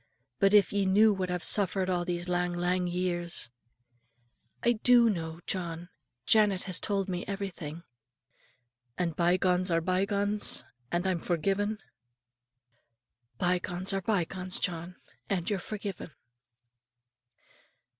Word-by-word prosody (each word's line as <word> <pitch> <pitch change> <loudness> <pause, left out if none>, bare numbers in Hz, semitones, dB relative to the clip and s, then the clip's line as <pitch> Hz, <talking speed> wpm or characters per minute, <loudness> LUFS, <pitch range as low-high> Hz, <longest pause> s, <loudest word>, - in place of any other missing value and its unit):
But 195 -1 +4
if 205 -1 +5
ye 200 -1 +1
knew 210 +3 +5
what 185 -2 -3
I've 180 -1 -2
suffered 190 -2 +2
a' 180 -1 0
these 175 0 -2
lang 180 0 0
lang 180 +1 0
years, 175 -5 -1 0.5
" 120 0 -43
"I 240 - +4
do 235 0 +5
know, 165 -3 -5
John; 175 -2 -4 0.4
Janet 205 -4 +3
has 185 -2 +1
told 200 -2 -1
me 180 -1 -3
everything." 175 -5 -5 1.1
"And 170 -3 -1
bye 175 +2 +3
gones 185 0 +2
are 165 -1 +2
bye 185 +3 +1
gones; 205 -6 0 0.3
and 175 +2 0
I'm 185 -2 0
forgiven?" 195 +6 -1 1.6
"Bye 180 +4 +2
gones 180 +2 0
are 195 - -1
bye 195 -3 +1
gones, 185 +1 -2
John; 175 0 -3 0.3
and 180 -4 -1
you're 200 - 0
forgiven." 200 -1 -6
180 Hz, 135 wpm, -29 LUFS, 175-195 Hz, 1.6 s, if